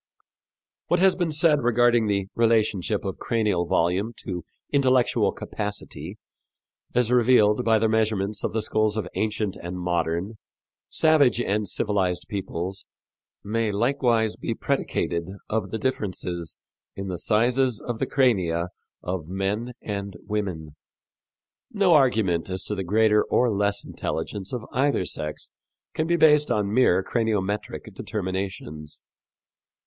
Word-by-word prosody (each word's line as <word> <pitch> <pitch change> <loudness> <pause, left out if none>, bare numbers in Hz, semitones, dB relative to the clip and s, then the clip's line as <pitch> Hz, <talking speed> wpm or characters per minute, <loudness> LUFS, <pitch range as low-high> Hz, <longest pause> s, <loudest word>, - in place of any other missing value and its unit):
What 175 - +2
has 190 0 +5
been 175 -3 -1
said 150 -1 +4
regarding 120 -1 +3
the 100 -2 0
relation 110 -4 +2
of 100 -3 -2
cranial 105 -7 0
volume 90 +8 +1
to 90 -2 -4 0.3
intellectual 130 -3 +3
capacity, 105 0 -5 0.8
as 125 -1 +2
revealed 120 -2 +4
by 115 -1 +4
the 110 - +2
measurements 110 -2 0
of - - -1
the 110 -1 -1
skulls 110 0 +1
of 105 -5 -2
ancient 105 -2 -1
and 90 +1 -6
modern, 85 +4 -2 0.5
savage 150 -6 +4
and 105 -3 0
civilized 95 -4 0
peoples 95 -1 -4 0.6
may 110 +1 0
likewise 115 0 +1
be - - -3
predicated 85 +1 -1 0.2
of 105 -3 -1
the 110 - -3
differences 90 - -3 0.4
in 100 0 -5
the 90 -3 -4
sizes 120 +4 +2
of 120 -2 -5
the - - 0
crania 90 - +1 0.3
of 90 -3 -3
men 100 +6 -2
and 100 -2 -4
women. 95 -8 -3 1.0
No 200 -6 +3
argument 110 - +3
as 95 0 -2
to - - -2
the 95 -2 -3
greater 105 +3 +3
or 125 -1 +2
less 100 0 0
intelligence 95 +4 -4
of 120 -4 -4
either 140 +2 +1
sex 75 0 -5 0.4
can 155 - -1
be 170 - +3
based 150 -2 +5
on 105 -2 0
mere 95 -7 +4
craniometric 105 -3 -2
determinations. 95 -6 -5
105 Hz, 130 wpm, -25 LUFS, 95-120 Hz, 1.0 s, has